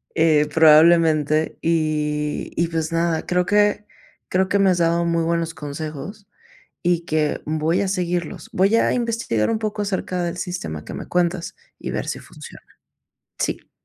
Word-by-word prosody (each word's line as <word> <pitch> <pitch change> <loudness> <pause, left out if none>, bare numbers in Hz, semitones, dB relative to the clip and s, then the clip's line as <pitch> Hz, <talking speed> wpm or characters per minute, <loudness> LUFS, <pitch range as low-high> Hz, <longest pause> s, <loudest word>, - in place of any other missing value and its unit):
Eh, 155 -2 +3
probablemente, 155 -1 +5
y 150 -2 -1
y 170 - +2
pues 160 -1 -2
nada, 165 -1 0
creo 180 0 +1
que 210 +1 +2 0.4
creo 190 +1 +1
que 200 - +2
me 195 -1 +4
has 180 - +1
dado 170 0 +2
muy 170 -1 +1
buenos 165 0 -1
consejos 155 +7 -7 0.6
y 175 -1 +1
que 155 -2 0
voy 155 +2 0
a 200 - 0
seguirlos. 175 -2 -2
Voy 195 +4 +3
a 230 - +3
investigar 230 - -1
un 225 - +1
poco 215 -1 -3
acerca 190 -2 -2
del 175 +1 -3
sistema 80 - -5
que - - -8
me - - -7
cuentas 175 -1 -1 0.2
y - - -6
ver - - -3
si - - -3
funciona. - - -12 0.8
Sí. - - -3
170 Hz, 160 wpm, -21 LUFS, 155-185 Hz, 0.8 s, probablemente